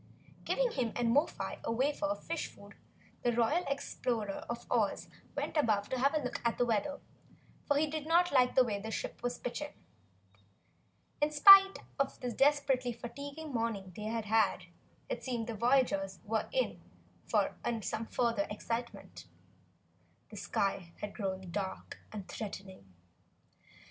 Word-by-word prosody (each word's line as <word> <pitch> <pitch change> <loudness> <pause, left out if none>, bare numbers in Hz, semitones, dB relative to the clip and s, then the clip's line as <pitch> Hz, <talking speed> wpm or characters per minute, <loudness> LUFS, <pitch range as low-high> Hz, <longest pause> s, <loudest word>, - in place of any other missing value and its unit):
Giving - - +1
him 240 - -1
and 235 -1 +1
Mo 290 +6 +4
fi - - -6
a - - -1
wafer 285 +5 +1
of 300 - -3
fish - - -3
food, - - -14 0.5
the 240 - +2
Royal 240 +10 +2
Explorer 235 -6 -2
of 235 0 -4
Oz - - +1 0.3
went - - -3
above 215 -9 +2
to 260 - -1
have 275 +4 +3
a - - +3
look 250 - -3
at 235 -1 +1
the 245 - +3
weather, 235 +5 0 0.7
for 285 - +3
he 305 - +3
did 310 0 -4
not 350 +2 +4
like 250 -3 +4
the 260 - +7
way 210 -4 -2
the 220 +2 -6
ship - - -4
was 245 0 -2
pitching. 290 +4 -5 1.5
In 295 - +4
spite 390 +6 +9 0.2
of 275 - 0
the 250 -1 -3
desperately 270 -1 +2
fatiguing 280 +6 -7
morning 220 -6 -2
they 210 - -6
had 225 0 -2
had, 215 -3 +2 0.4
it - - -4
seemed 240 -3 -2
the 230 - -4
voyagers 220 -5 +2
were 220 0 -1
in - - -1 0.5
for - - +2 0.3
some 220 +2 -3
further 230 -4 0
excitement. 230 +3 -5 1.0
The - - -9
sky 190 -3 -1
had 205 -1 -4
grown 190 -4 -4
dark 195 0 -4
and 205 -3 -7
threatening. 190 - -7
240 Hz, 155 wpm, -33 LUFS, 215-285 Hz, 1.5 s, spite